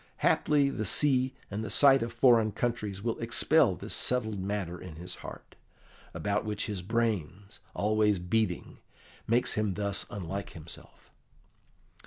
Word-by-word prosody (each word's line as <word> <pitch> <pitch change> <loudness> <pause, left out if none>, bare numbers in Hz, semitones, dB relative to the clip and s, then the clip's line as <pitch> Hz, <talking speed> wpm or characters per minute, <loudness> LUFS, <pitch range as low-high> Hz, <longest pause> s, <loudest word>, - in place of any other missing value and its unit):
Haply 145 -2 +3
the 110 - -3
sea 130 +4 +2 0.2
and 105 +2 -3
the 110 - -5
sight 135 +5 +6
of 115 0 -3
foreign 115 -3 +4
countries 105 -5 -3
will 115 -1 -2
expel - - +3
this - - -5
settled 110 -5 0
matter 95 -3 -4
in 85 -4 -9
his 90 +3 -6
heart, - - -11 0.6
about 100 0 -1
which 105 -1 -2
his 105 -5 -4
brains, 105 -3 -2 0.2
always 105 -1 +2
beating, 90 +1 -2 0.5
makes 120 +2 +2
him 105 -3 -1
thus 100 -1 -1
unlike 100 0 -6
himself." 80 0 -11
105 Hz, 140 wpm, -29 LUFS, 95-115 Hz, 0.6 s, sight